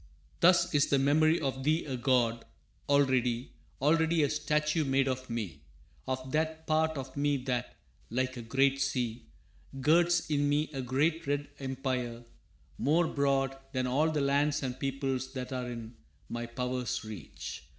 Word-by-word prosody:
«Thus 175 0 +5
is 145 -1 +4
the 140 - +3
memory 155 +4 +4
of 135 -2 -2
thee 155 +4 +1
a 135 -3 -3
god 120 -2 +1 0.5
Already, 130 -4 +2 0.3
already 160 +2 +3
a 145 - +1
statue 150 +1 +1
made 135 -1 +2
of 130 -1 -3
me 115 -6 -4 0.5
Of 130 0 -3
that 160 +1 -1
part 160 0 +1
of 130 -1 -6
me 145 0 +1
that, 125 -2 -2 0.3
like 130 +2 -1
a 120 - -6
great 135 +4 +2
sea, 125 -4 -2 0.5
Girds 170 +5 +3
in 145 -2 +1
me 150 +1 +1
a 135 - -3
great 140 +6 0
red 145 0 -1
empire 130 -3 -3 0.6
more 160 +4 +3
broad 135 -1 +1 0.2
Than 130 -1 0
all 140 +6 +2
the 155 -2 0
lands 145 +1 +2
and 130 -1 -3
peoples 135 -1 -2
that 130 -1 -5
are 125 -1 -3
in 115 -1 -7 0.4
My 120 0 -4
power's 125 +1 -2
reach. 105 -13 -7
135 Hz, 155 wpm, -30 LUFS, 125-150 Hz, 0.6 s, Thus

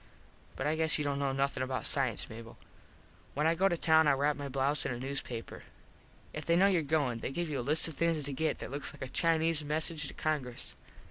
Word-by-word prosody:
But 135 - -3
I 150 +1 +1
guess 160 -1 +2
you 150 - -1
dont 140 -1 -1
know 140 -1 0
nothin 135 0 -1
about 130 0 -2
cience, 130 -6 +2
Mable. 115 +1 -10 0.8
When 150 +2 +1
I 165 - +4
go 190 +4 +3
to 175 - 0
town 160 -1 +4
I - - +5
wrap 145 +2 +1
my 140 -1 -5
blouze 140 +2 +1
in - - -2
a 125 - -3
newspaper. 125 -3 -4 0.7
If 155 - -5
they 170 - +2
know 185 +3 +5
your 190 -4 +3
goin 140 -6 0
they - - -3
give 170 +3 -3
you 140 - -1
a - - -1
list 155 +2 +3
of 165 - -6
things 165 0 0
to 140 0 -3
get 155 +4 0
that - - -7
looks 140 +1 -4
like - - -8
a - - -4
Chinese 165 +1 +1
Message 155 +1 0
to - - -8
Congress. 140 -6 -3
145 Hz, 240 wpm, -32 LUFS, 135-160 Hz, 0.8 s, I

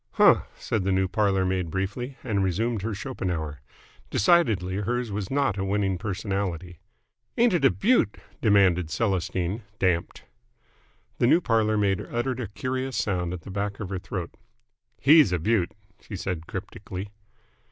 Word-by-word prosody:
"Huh!" - - +5
said 110 - -2
the 95 - +1
new 95 0 +2
parlour 95 -1 +1
maid 95 -2 -1
briefly, 115 - -3
and 105 -6 0
resumed 110 +4 0
her 110 +1 -3
Schopenhauer. 90 - -4 0.5
Decidedly 105 - +3
hers 120 +3 -1
was 100 -1 -3
not 135 -8 +1
a - - 0
winning 95 -2 0
personality. 95 -3 -3 0.6
"Ain't 235 -3 +4
it 160 -6 +2
a - - +8
beaut?" 215 - +2 0.2
demanded 95 -6 +4
Celestine, 95 0 -1 0.2
damped. 90 -4 0 1.0
The 120 - +4
new 165 - +6
parlour 110 -7 +2
maid 100 -2 +1
uttered 125 +2 -2
a 120 - -3
curious 130 +5 -3
sound 90 -4 -1
at 90 -2 -5
the 95 - -9
back 100 +1 -3
of 100 - -5
her 95 -2 -3
throat. 90 -1 -5 0.7
"He's 150 - +6
a 90 - +2
beaut!" 95 +1 +1 0.3
she 105 - -9
said 90 -4 -4
cryptically. 95 0 -6
100 Hz, 150 wpm, -26 LUFS, 95-115 Hz, 1.0 s, a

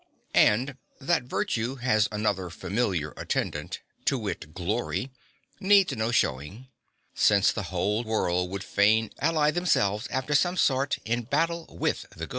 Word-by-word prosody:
And 125 +6 +3 0.2
that 145 -1 0
virtue 125 0 -2
has 120 -5 +1
another 105 -4 -1
familiar 90 -4 -2
attendant - - -3 0.2
to - - +2
wit, 75 - -5
glory 110 +7 -2 0.5
needs 195 -1 +4
no 110 +1 -1
showing, 95 - -1 0.4
since 100 -1 +4
the 105 - -3
whole 100 +5 0
world 90 -5 0
would 100 +1 -5
fain 105 +3 +2
ally 155 -1 +2
themselves 115 - +1
after 130 +3 -2
some 175 +5 +2
sort 140 -2 +2
in 120 +2 0
battle 165 +7 -1
with - - -2
the - - -5
good. - - -16
110 Hz, 140 wpm, -27 LUFS, 100-135 Hz, 0.5 s, needs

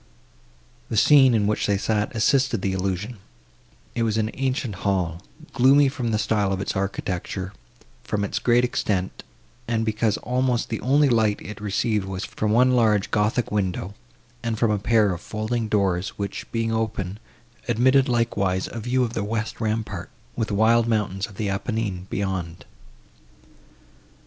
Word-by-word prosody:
The 110 - -2
scene, 135 0 +6
in 105 -2 +2
which 105 +1 0
they 100 -1 +2
sat, 105 +2 -1
assisted 125 -1 +2
the 95 - 0
illusion; 95 +4 -3 0.7
it 120 - -2
was 110 -1 +1
an 110 0 0
ancient 130 -6 -2
hall, 90 -4 -1 0.3
gloomy 135 +2 +5
from 130 -4 -3
the 110 - +1
style 105 -2 +1
of 95 - -1
its 100 - -3
architecture, 95 -1 -3 0.5
from 105 -1 -2
its 100 - -2
great 120 0 +3
extent, 100 -6 -1 0.5
and 115 -1 0
because 110 -1 +1
almost 125 -1 0
the 110 - -3
only 145 +3 +4
light 110 -4 +2
it 105 0 -9
received 105 0 0
was 95 0 -4
from 105 -1 -2
one 125 +3 +5
large 110 -5 +2
gothic 105 +3 +1
window, 95 -2 -2 0.5
and 115 -2 -2
from 115 0 +2
a 105 - +1
pair 105 -2 +3
of 85 - -7
folding 110 +1 -2
doors, 95 -3 0
which, 100 -1 -5
being 115 -1 -1
open, 110 -3 -2 0.5
admitted 130 +3 +3
likewise 100 -6 0
a 115 - -5
view 125 +3 +1
of 115 -2 -2
the 100 - -2
west 110 +2 -3
rampart, 110 -5 -2 0.3
with 115 -2 -1
the 105 - -2
wild 115 +2 +4
mountains 105 -3 -1
of 100 - -14
the 105 +1 -2
Apennine 100 -2 -2
beyond. 95 -4 -3
110 Hz, 160 wpm, -24 LUFS, 100-115 Hz, 0.7 s, scene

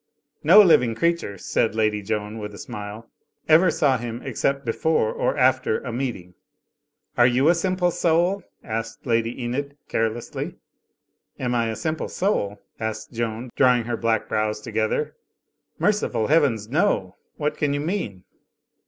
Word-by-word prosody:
"No 185 +8 +9
living 125 - +4
creature," 170 -9 0
said 110 +4 0
Lady 110 -1 +1
Joan, 105 +1 -3
with 105 -1 -6
a - - -10
smile, 105 +3 -7 0.4
"ever 165 +3 +6
saw 140 -5 +2
him 120 0 -5
except 140 -1 -1
before 115 0 +1
or - - -1
after 130 -3 +3
a 120 - -6
meeting." 115 -9 -4 0.9
"Are 120 - +7
you 130 +5 +3
a - - +6
Simple 180 0 0
Soul?" 175 +4 +2 0.2
asked 115 0 -5
Lady 115 0 0
Enid, 140 +4 -3
care 115 0 +1
lessly. 115 +2 -6 0.8
"Am 125 -2 -2
I 115 -1 +1
a 110 - -3
simple 160 +3 -3
soul?" 105 - -1 0.2
asked 110 0 -4
Joan, 115 +1 -3
drawing 125 -3 +4
her 120 +1 -2
black 115 -1 0
brows 105 0 -1
together. 110 -1 -1 0.6
"Merciful 200 - +1
Heavens, 135 -9 +2
no! 125 - 0 0.2
What 150 0 -1
can 145 -1 0
you - - -1
mean?" 145 - -3
120 Hz, 150 wpm, -23 LUFS, 110-150 Hz, 0.9 s, No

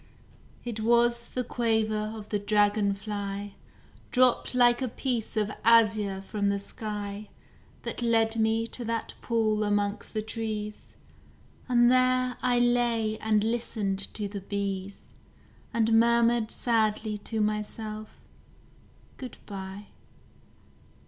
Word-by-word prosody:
It 235 -2 -4
was 235 +1 +3
the 250 - -2
quaver 220 -3 0
of 210 -1 -10
the 205 - 0
dragon 205 0 +2
fly, 200 -1 -5 0.6
Dropped 250 0 +2
like 240 0 +5
a 260 - 0
piece 235 -2 -3
of 210 -1 +1
azure 215 -4 +4
from 200 +1 -1
the 200 - +1
sky, 205 0 -6 0.5
That - - -5
led 225 -1 +2
me 225 +1 +2
to 240 +1 -5
that 230 0 -3
pool 220 -2 +1
amongst 205 +1 -1
the 215 - -1
trees 215 -1 -5 0.7
And 240 -1 +5
there 255 0 +3
I 250 -1 +2
lay 240 -3 +1
and 215 -1 +2
listened 220 -4 -1 0.2
to 210 -2 -3
the 200 0 -6
bees, 195 -1 -4 0.6
And 225 -1 +2
murmured 235 -1 +3
sadly 215 -2 +1
to 220 +2 -4
myself: 215 0 -3 1.0
"Good 255 -2 -8
bye." 195 0 -8
220 Hz, 120 wpm, -28 LUFS, 205-235 Hz, 1.0 s, like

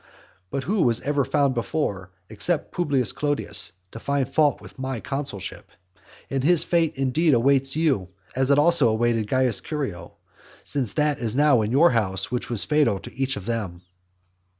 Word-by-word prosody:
But 135 +5 -3
who 200 +6 0
was 120 -4 +3
ever 145 0 0
found 140 0 +1
before, 115 -7 -3 0.2
except 130 - -2
Publius 140 -9 +1
Clodius, 105 -11 -1 0.2
to 115 - -9
find 140 +1 -1
fault 145 +1 +2
with - - -15
my 130 -2 -3
consulship? 135 - -6 0.6
And 135 -1 -2
his 170 +2 +4
fate 170 -2 0
indeed 135 +3 +2
awaits 135 +3 +2
you, 140 - 0 0.3
as 130 +1 +1
it 140 - +4
also 150 -4 +5
awaited 110 -1 0
Caius 130 -5 +1
Curio; 105 - -5 0.5
since 130 -7 -2
that 150 -1 0
is 115 -1 -1
now 145 -4 +4
in 105 - -2
your 155 +7 +5
house 95 -4 -1
which 125 - -3
was 120 -4 +2
fatal 145 -10 +1
to - - -11
each 135 -1 -1
of 100 - -8
them. 105 -7 -4
130 Hz, 170 wpm, -23 LUFS, 115-145 Hz, 0.6 s, also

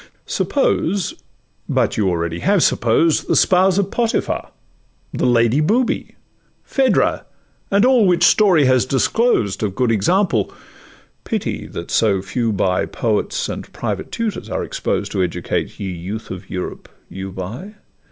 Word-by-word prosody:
Suppose,—but 200 - -2
you 100 -3 +1
already 85 -1 -2
have 195 -2 +2
supposed, 120 +8 +2
The - - +2
spouse 185 0 +4
of 200 -1 0
Potiphar, 235 0 -1 0.6
the - - 0
Lady 120 +2 +3
Booby, 230 +11 0 0.5
Phaedra, 270 -2 +1 0.5
and 200 +3 +3
all 250 -5 +5
which 175 -1 +3
story 180 -6 +5
has 130 -1 +3
disclosed 135 - +1
Of 100 -3 -2
good 125 -3 +1
examples; 115 - +1 0.7
pity - - -3
that 85 - -7
so 100 -4 +2
few 115 +3 -1
by 95 -2 0
Poets - - -1
and - - -6
private - - -4
tutors 225 -4 -3
are - - -2
exposed, - - -2
To 95 - -1
educate—ye 90 +2 -3
youth 95 +6 -6
of 95 +1 -8
Europe—you 95 +1 -7
by! 115 - -7
125 Hz, 130 wpm, -19 LUFS, -, 0.7 s, all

